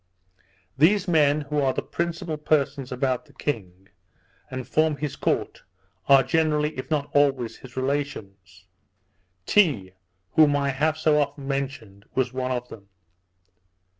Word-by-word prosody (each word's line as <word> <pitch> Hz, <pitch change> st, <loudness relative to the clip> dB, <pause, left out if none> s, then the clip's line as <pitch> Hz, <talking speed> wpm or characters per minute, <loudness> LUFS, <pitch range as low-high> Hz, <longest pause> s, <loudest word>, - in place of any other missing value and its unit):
These 195 Hz, +6 st, +4 dB
men, 150 Hz, -3 st, +3 dB
who 145 Hz, 0 st, -1 dB
are 135 Hz, -2 st, +2 dB
the -, -, -2 dB
principal 165 Hz, +2 st, -3 dB
persons 145 Hz, -3 st, 0 dB
about 125 Hz, 0 st, -1 dB
the -, -, -21 dB
king, 95 Hz, -9 st, -5 dB, 0.6 s
and 130 Hz, -2 st, -6 dB
form 155 Hz, -1 st, +1 dB
his 150 Hz, -2 st, -4 dB
court, -, -, -1 dB, 0.5 s
are 135 Hz, -1 st, +7 dB
generally, 155 Hz, 0 st, +1 dB
if 130 Hz, -, -6 dB
not 150 Hz, -2 st, -1 dB
always, 135 Hz, -5 st, +2 dB
his 130 Hz, 0 st, -14 dB
relations; 100 Hz, -10 st, -4 dB, 0.8 s
Tee, 125 Hz, -, +2 dB, 0.4 s
whom 150 Hz, -2 st, +5 dB
I 140 Hz, -1 st, +1 dB
have 155 Hz, +4 st, 0 dB
so 155 Hz, -1 st, +3 dB
often 140 Hz, -1 st, -4 dB
mentioned, 130 Hz, -8 st, -4 dB
was 130 Hz, -1 st, 0 dB
one 130 Hz, 0 st, -2 dB
of 125 Hz, -1 st, -2 dB
them. 100 Hz, -2 st, -12 dB
140 Hz, 135 wpm, -25 LUFS, 125-150 Hz, 0.8 s, are